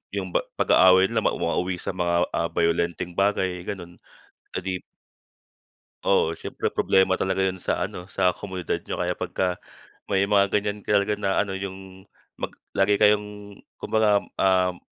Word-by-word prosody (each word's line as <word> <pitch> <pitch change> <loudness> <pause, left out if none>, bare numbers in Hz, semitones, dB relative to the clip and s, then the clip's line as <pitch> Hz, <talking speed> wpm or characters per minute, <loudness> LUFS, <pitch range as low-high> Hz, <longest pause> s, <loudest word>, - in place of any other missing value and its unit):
yung 95 -2 -3
ba - - +5 0.2
pag-aaway 95 +1 +6
nila 110 -2 0
mauwa 85 - 0
mauwi 90 0 -1
sa - - -3
mga, 85 -1 +1
ah, 85 - 0
bayolenteng 85 +1 0
bagay, 95 -3 +1
ganon. 90 -3 -7 0.6
Edi 95 0 -2
p - - -61 1.2
Oo, 85 -4 +2
siyempre - - -4
problema 95 0 +3
talaga 95 0 0
yan 95 -1 -3
sa - - 0
ano. 90 +2 -9
Sa 90 -2 +2
komunidad 95 -4 -4
niyo - - -5
kaya - - 0
pagka 90 -1 -2 0.5
may 100 0 +2
mga 100 -1 +3
ganyan 105 0 -1
talaga 100 +1 +1
na 100 -2 -1
ano? 100 -1 0
Yung 95 0 -8 0.3
mag - - -2 0.2
lagi 100 +1 +3
kayong 105 -1 +1 0.2
kumbagam, 105 -2 +2
um, 90 -1 +2
95 Hz, 155 wpm, -24 LUFS, 90-100 Hz, 1.2 s, pag-aaway